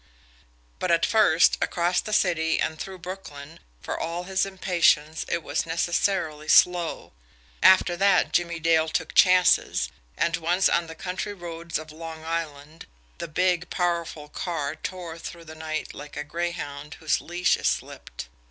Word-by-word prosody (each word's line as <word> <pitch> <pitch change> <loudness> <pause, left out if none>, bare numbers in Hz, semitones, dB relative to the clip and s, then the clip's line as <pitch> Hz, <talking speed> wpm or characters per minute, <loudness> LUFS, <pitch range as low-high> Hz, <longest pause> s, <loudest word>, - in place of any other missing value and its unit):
But 185 - -1
at 170 0 +3
first, 175 -7 +4
across 175 +1 +1
the 215 - -7
city 165 -6 +2
and 160 0 -2
through 190 -1 -6
Brooklyn, 165 -5 -9 0.2
for - - -4
all 170 +2 -3
his 190 +1 0
impatience, 170 -5 +1
it 170 - -2
was 145 +3 -2
necessarily 165 -2 -1
slow 175 -1 +3 0.5
after 185 -1 +6
that, 195 +1 +3
Jimmie 170 -1 +1
Dale 160 -1 +2
took - - -2
chances, 185 -1 +4 0.3
and, 170 +1 +1
once 175 +3 +2
on 170 -1 +1
the 160 - -9
country 185 +4 -4
roads 170 -2 -5
of 155 0 -9
Long 160 0 -9
Island, 160 -1 -5 0.3
the 170 - -4
big, 180 +2 0
powerful 170 -4 -2
car 150 -3 -3
tore 170 0 -7
through 170 0 -9
the 160 - -10
night 155 0 -5
like 150 +1 -10
a 150 - -2
greyhound 150 -2 -5
whose 155 -2 0
leash 175 +2 +1
is - - -2
slipped. - - -4
170 Hz, 150 wpm, -25 LUFS, 160-180 Hz, 0.5 s, after